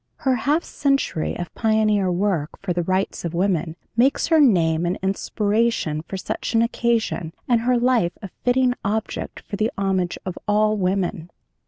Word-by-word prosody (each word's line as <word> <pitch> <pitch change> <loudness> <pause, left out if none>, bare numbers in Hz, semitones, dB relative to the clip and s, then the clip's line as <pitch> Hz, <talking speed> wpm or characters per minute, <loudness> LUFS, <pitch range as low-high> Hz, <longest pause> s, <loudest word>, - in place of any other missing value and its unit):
Her 265 -2 0
half 290 +8 +1
century 275 - -1
of 175 0 -6
pioneer 215 -4 +2
work 175 -4 -1
for 185 -2 -2
the 175 - 0
rights 185 +3 -1
of 170 -1 -3
women 175 -3 0 0.2
makes 255 +4 +3
her 325 -1 +5
name 170 - +4
an 180 - -1
inspiration 205 -4 0
for 190 +4 -6
such 220 +4 -4
an 225 - +5
occasion 230 -8 -1
and 235 -2 +3
her 250 +1 +2
life 240 -8 +2
a 195 - -8
fitting 250 0 +3
object 215 +2 -3
for 200 - -6
the 215 +2 +1
homage 190 -2 0
of 185 -2 -5
all 215 +1 +3
women. 185 -3 -1
205 Hz, 165 wpm, -22 LUFS, 180-235 Hz, 0.2 s, her